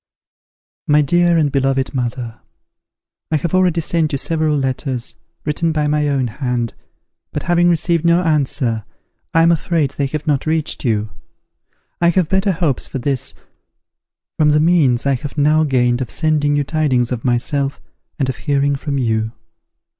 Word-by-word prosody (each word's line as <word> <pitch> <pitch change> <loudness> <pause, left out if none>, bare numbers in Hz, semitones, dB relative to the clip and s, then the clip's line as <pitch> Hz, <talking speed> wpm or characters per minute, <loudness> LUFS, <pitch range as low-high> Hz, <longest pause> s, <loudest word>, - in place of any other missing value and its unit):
"MY 150 0 +4
DEAR 175 +3 +3
AND 150 -3 +2
BELOVED 135 0 0
MOTHER, 120 -2 -3 0.9
"I 160 - +1
have 155 +3 -2
already 180 -2 +3
sent 160 -1 0
you - - +1
several 155 +1 0
letters, 130 -2 -2 0.3
written 160 +2 0
by 155 -1 0
my 150 0 +1
own 135 -2 +1
hand, 120 -1 -2 0.6
but 150 - -4
having 175 0 +3
received 170 0 +1
no 170 +1 +3
answer, 135 -8 0 0.5
I 165 - +6
am 170 - +5
afraid 165 -3 0
they 140 - -2
have 150 +2 -5
not 145 -1 0
reached 160 -1 -1
you. 110 -4 0 0.9
I 170 - +5
have 175 -2 +1
better 190 +1 +2
hopes 165 -7 -1
for - - -5
this, 135 0 -2 1.0
from 150 -1 +4
the 150 0 +4
means 150 -7 +3
I 140 - +3
have 140 +3 -5
now 155 +2 +3
gained 125 -3 +1
of 125 - -3
sending 150 -2 +1
you 145 - +1
tidings 135 -5 0
of 120 -2 -3
myself, 135 +3 0 0.4
and 135 - 0
of 130 - -3
hearing 140 0 +1
from 140 0 -3
you. 110 -3 -1
145 Hz, 160 wpm, -18 LUFS, 130-160 Hz, 1.0 s, I